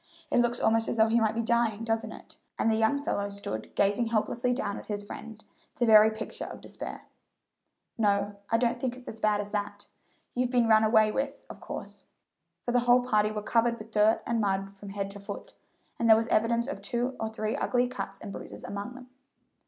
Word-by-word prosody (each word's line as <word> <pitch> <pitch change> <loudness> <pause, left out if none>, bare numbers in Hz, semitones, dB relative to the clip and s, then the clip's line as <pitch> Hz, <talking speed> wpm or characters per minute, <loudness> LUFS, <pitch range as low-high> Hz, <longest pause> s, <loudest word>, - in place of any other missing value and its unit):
It - - +4
looks 240 0 +2
almost 225 0 +2
as - - -2
though 220 0 +5
he 230 +1 +4
might 220 -1 +1
be 230 - 0
dying, 230 -2 +1
doesn't 225 0 -1
it?" - - -13 0.2
and 225 - +2
the - - +2
young 225 +6 +2
fellow 205 -7 -1
stood 200 - -6
gazing 205 +4 +2
helplessly 235 +2 0
down 210 -5 -2
at - - -13
his 205 -1 -2
friend, 220 +1 -9 0.3
the 240 - +1
very 215 -1 +8
picture 220 0 -6
of - - -8
despair. - - -8 1.0
"No; 205 -1 +1
I 230 - +3
don't 240 0 +1
think 250 -1 -2
it's 255 - -14
as 225 - -6
bad 210 -1 +2
as 205 0 -8
that. 205 -1 -3 0.5
You've 250 0 0
been 245 -2 +3
run 220 -1 +6
away 220 -1 +4
with, 275 +4 -3
of - - -12
course," - - -8 0.6
for 245 - -2
the 245 - +4
whole 245 +1 +6
party 210 -4 +3
were 210 -1 -4
covered 235 +1 +2
with 220 0 -12
mud 215 +1 +4
and 230 -1 0
dirt 195 0 -1
from 200 0 -10
head 200 0 -4
to 200 - -9
foot, 200 0 -8 0.5
and 230 - +2
there 220 - +9
was 225 +1 0
evidence 230 +2 +2
of 285 - -5
two 250 +1 -2
or 220 - -2
three 220 0 -2
ugly 245 0 +1
cuts 245 -6 -6
and 195 - -8
bruises - - -9
among 205 +5 -5
them. 255 -1 -11
220 Hz, 215 wpm, -29 LUFS, 205-235 Hz, 1.0 s, there